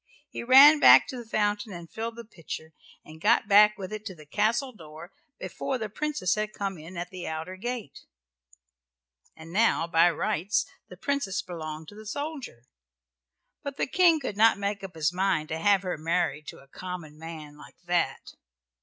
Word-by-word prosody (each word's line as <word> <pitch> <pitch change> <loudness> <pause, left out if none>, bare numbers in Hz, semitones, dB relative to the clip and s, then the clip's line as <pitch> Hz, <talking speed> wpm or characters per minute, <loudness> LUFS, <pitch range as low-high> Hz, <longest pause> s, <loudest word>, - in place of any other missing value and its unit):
He - - -5
ran 275 +5 +8
back 125 - +8
to 260 - -6
the 235 -2 -10
fountain 210 0 -1
and 170 -2 -8
filled 225 +5 -5
the 235 0 -9
pitcher, 160 -5 -9 0.3
and 155 +1 -13
got 230 +1 +3
back 210 0 +6
with 195 +1 -7
it 215 0 -6
to 190 -4 -6
the 155 -2 -15
castle 220 - 0
door 160 -1 -12 0.3
before 265 - -4
the 220 -3 -5
Princess 295 - -1
had 215 0 -3
come 195 -4 -4
in 170 +4 -10
at 175 +1 -5
the 185 -2 -7
outer 160 +4 -5
gate. 235 - -6 1.4
And 160 +1 -12
now 220 -5 +3
by 170 0 +4
rights 205 +4 -1 0.2
the 180 - -12
Princess 210 -6 -2
belonged 160 -4 -7
to 205 - -14
the 215 0 -11
soldier, 285 - -6 1.0
but 280 -1 -6
the - - 0
King 335 +1 +4
could 255 -8 -5
not 225 0 +5
make 200 0 -3
up 190 -3 -8
his 160 +1 0
mind 180 -4 0
to 160 - -3
have 200 +2 +3
her 180 -4 -3
married 165 -2 -1
to - - -8
a 135 - -20
common 165 -1 -8
man 155 -2 -9
like 150 - -15
that. 175 -6 -1
190 Hz, 185 wpm, -27 LUFS, 165-220 Hz, 1.4 s, ran